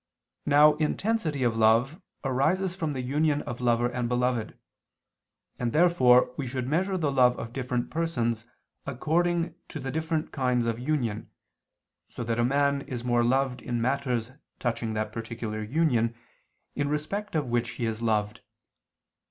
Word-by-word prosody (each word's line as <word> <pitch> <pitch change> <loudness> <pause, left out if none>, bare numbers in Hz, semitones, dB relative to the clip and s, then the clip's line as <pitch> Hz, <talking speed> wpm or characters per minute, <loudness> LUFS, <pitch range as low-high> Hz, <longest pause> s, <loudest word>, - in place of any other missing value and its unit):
Now 150 +1 +7
intensity 160 - 0
of 120 -2 +1
love 115 - +3 0.2
arises 160 +8 +1
from 160 -5 -2
the 130 -2 -3
union 145 +3 +1
of 120 +1 -6
lover 120 0 +2
and 120 -1 -2
beloved: 125 -2 0 1.0
and 120 -2 -1
therefore 130 -8 +5
we 140 - -3
should 125 0 -3
measure 185 +6 0
the 155 -5 0
love 125 -2 +4
of 115 +1 -6
different 125 -2 -2
persons 120 -9 -1 0.4
according 165 +5 0
to 155 - -7
the 135 -1 -4
different 160 +1 -2
kinds 125 -3 +1
of 115 0 -1
union, 120 -6 -2 0.8
so 120 - -6
that 115 0 -1
a - - +3
man 140 +2 +2
is 125 -3 -6
more 120 -1 +2
loved 130 +1 +1
in 120 -2 -2
matters 125 -1 -1 0.3
touching 115 -2 -2
that 110 0 -2
particular 115 -1 -5
union 115 -2 +1 0.6
in 145 - -1
respect 195 +7 -3
of 150 -3 +1
which 120 0 +1
he 120 - -1
is 110 0 -3
loved. 105 -2 0
125 Hz, 150 wpm, -27 LUFS, 120-150 Hz, 1.0 s, Now